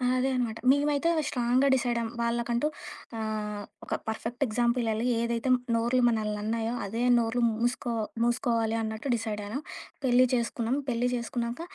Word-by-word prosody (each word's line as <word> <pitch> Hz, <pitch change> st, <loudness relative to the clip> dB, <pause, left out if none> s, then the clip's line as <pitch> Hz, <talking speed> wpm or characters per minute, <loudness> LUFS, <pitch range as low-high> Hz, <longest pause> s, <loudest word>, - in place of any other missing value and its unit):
ఆ! -, -, -1 dB
అదే 265 Hz, +1 st, +1 dB
అనమాట. 230 Hz, -3 st, -1 dB
మేమైతే 290 Hz, +3 st, +2 dB, 0.2 s
స్ట్రాంగ్‌గా 250 Hz, +2 st, +2 dB
డిసైడయ్యాం. 235 Hz, -2 st, 0 dB
వాళ్ళకంటూ 235 Hz, +2 st, 0 dB, 0.5 s
ఆహ్, 210 Hz, -1 st, -3 dB, 0.2 s
ఒక -, -, -3 dB
పర్‌ఫెక్ట్ 230 Hz, +3 st, -4 dB
ఎగ్జాంపుల్ 240 Hz, +2 st, +1 dB
ఇయ్యాలి. 220 Hz, +2 st, 0 dB
ఏదైతే 235 Hz, +2 st, -1 dB, 0.3 s
నోర్లు 240 Hz, +2 st, +2 dB
మనలిని 215 Hz, -2 st, 0 dB
అన్నాయో 225 Hz, +2 st, -1 dB
అదే 225 Hz, +4 st, -3 dB, 0.2 s
నోర్లు 235 Hz, +1 st, 0 dB
మూసుకో 240 Hz, +2 st, -1 dB, 0.3 s
మూసుకోవాలి 230 Hz, -2 st, +1 dB
అన్నట్టు 220 Hz, +4 st, -4 dB
డిసైడయ్యాను. 215 Hz, +1 st, -4 dB, 0.5 s
పెళ్లి 255 Hz, 0 st, +5 dB
చేసుకున్నాం. 235 Hz, +1 st, 0 dB
పెళ్లి 245 Hz, 0 st, +1 dB
జేసుకున్నాక, 235 Hz, +2 st, -3 dB
235 Hz, 135 wpm, -28 LUFS, 225-245 Hz, 0.5 s, పెళ్లి